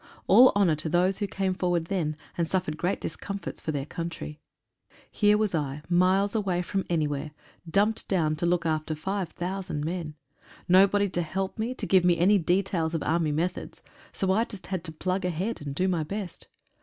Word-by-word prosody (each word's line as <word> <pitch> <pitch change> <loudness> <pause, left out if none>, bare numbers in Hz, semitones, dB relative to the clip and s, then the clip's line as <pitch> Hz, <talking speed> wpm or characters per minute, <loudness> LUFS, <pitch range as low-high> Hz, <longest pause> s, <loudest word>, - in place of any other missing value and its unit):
All 255 +1 +8
honour 195 -5 +4
to 160 - -4
those 180 +3 +2
who 205 - -1
came 190 -1 -1
forward 175 -3 0
then 165 -5 -2 0.2
and 170 -1 0
suffered 165 -4 -1
great 175 +4 -1
discom 200 0 -5
forts 175 - -7
for 155 - -2
their 140 -2 -3
country. 165 -2 -6 0.7
Here 210 -1 +4
was 210 -3 0
I, 150 -2 -2
miles 185 +3 +3
away 190 -5 0
from 195 +1 -2
anywhere, 150 -3 -1 0.4
dumped 205 +5 +1
down 160 -5 +1
to 170 - 0
look 170 -1 +1
after 155 0 -1
5,000 180 -2 -3
men. 165 -2 -4 0.5
No 185 +2 +7
tody 205 +1 +1
to 175 -1 -1
help 190 +5 -3
me, 235 +4 -2
to - - -3
give 190 -2 +4
me 175 -1 +4
any 195 +4 +4
details 175 -1 0
of 160 - -1
army 160 -1 +1
methods. 170 +4 -3 0.3
So 190 -1 0
I 215 +4 +3
just 205 -5 -7
had 185 -3 -3
to 160 - -5
plug 185 +4 -2
ahead, 180 +5 -2
and 140 -1 -5
do 185 +5 +1
my 175 -3 +1
best. 190 +3 -6
180 Hz, 195 wpm, -27 LUFS, 160-195 Hz, 0.7 s, All